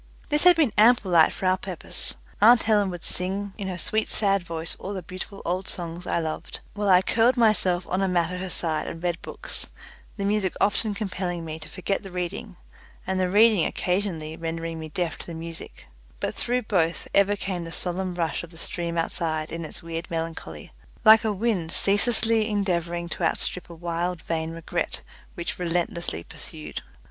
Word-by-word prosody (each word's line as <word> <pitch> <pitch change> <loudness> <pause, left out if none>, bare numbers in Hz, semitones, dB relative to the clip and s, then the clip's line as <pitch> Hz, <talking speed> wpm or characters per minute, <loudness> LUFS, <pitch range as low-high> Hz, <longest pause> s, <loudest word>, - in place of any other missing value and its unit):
This 300 +2 +3
had 360 -1 +9
been 305 -9 +2
ample 220 -3 +5
light 165 -2 +6
for - - -5
our 185 0 +3
purpose. 185 -4 -4 0.3
Aunt 230 +2 +7
Helen 205 -3 +3
would 175 -2 -7
sing 195 +2 -3
in 200 -3 -5
her 185 -2 -3
sweet 215 +4 -1
sad 200 -2 +2
voice 165 -1 -3
all 200 +1 -5
the 185 - -5
beautiful 185 +3 -7
old 185 +2 -1
songs 170 0 -3
I - - +1
loved, 160 -2 -4
while 205 -1 -1
I 185 0 +6
curled 235 +5 +3
myself 190 -6 +3
on 185 +2 0
a 195 - +2
mat 175 -2 +1
at 180 - -4
her 190 0 -4
side 165 -3 -2
and 165 +1 -7
read 175 -1 -1
books - - -7 0.5
the 200 - -2
music 200 -2 +1
often 210 +1 +1
compelling 180 -4 -3
me 160 0 -5
to 155 - -9
forget 195 +1 -2
the 195 - -9
reading, 180 +2 -5 0.5
and 190 0 -1
the 185 -1 +1
reading 210 -2 +5
occasionally 180 -5 -1
rendering 165 0 -4
me 160 0 -6
deaf 170 +1 -2
to - - -8
the 170 - -6
music; 165 0 -7 0.3
but - - -2
through 250 +1 -1
both 170 -6 0
ever 200 +1 +4
came 190 -3 -3
the 165 - -7
solemn 180 +1 -1
rush 165 -2 -1
of 170 - -10
the 165 - -15
stream 170 0 -3
outside 160 -1 -1
in 165 0 -4
its 160 +2 -6
weird 165 +1 -5
melancholy, 165 0 -5 0.3
like 220 +1 +9
a 220 - +1
wind 200 -5 -1
ceaselessly 220 +3 +4
endeavouring 175 -4 -1
to 175 - -6
outstrip 175 +2 +3
a 170 - -9
wild 170 0 -3
vain 160 -1 -2
regret 165 0 -3 0.3
which 170 -1 -4
relentlessly 170 - -1
pursued. 75 -3 -7
180 Hz, 190 wpm, -25 LUFS, 165-200 Hz, 0.5 s, had